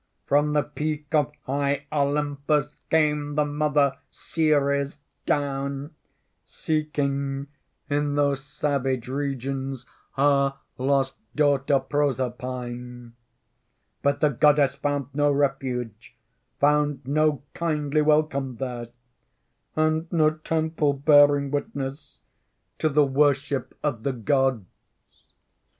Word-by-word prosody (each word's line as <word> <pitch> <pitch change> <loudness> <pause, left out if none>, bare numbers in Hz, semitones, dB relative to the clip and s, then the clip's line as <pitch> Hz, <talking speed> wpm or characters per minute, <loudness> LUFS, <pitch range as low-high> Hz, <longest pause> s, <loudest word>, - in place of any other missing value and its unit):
"From 145 +1 +2
the 150 -1 +3
peak 150 0 -4
of 150 -3 +2
high 140 +1 -1
Olympus 145 0 0
Came 150 -2 +1
the 150 0 +2
mother 145 -2 +1
Ceres 140 -3 0 0.3
down, 140 +1 -1 0.5
Seeking 140 -3 -2 0.4
in 145 0 0
those 140 -2 +1
savage 135 -4 -1
regions 135 -1 -3 0.3
Her 140 0 +3 0.2
lost 135 0 +1 0.2
daughter 140 -2 +3
Proserpine. 125 -3 -3 0.9
But 140 0 +1
the 150 - +5
Goddess 145 0 +4
found 140 -1 -2
no 145 +1 +2
refuge, 130 -5 -2 0.4
Found 145 -1 +2
no 150 0 +1
kindly 155 -3 0
welcome 150 -4 +1
there, 120 -1 -5 0.9
And 155 +1 +1
no 155 -3 +4
temple 155 -1 0
bearing 145 0 +5
witness 140 0 -5 0.6
To 155 - +2
the 150 0 +4
worship 140 -1 +1
of 130 -7 -1
the 135 +3 -1
gods. 130 -1 +1
140 Hz, 100 wpm, -25 LUFS, 135-150 Hz, 0.9 s, the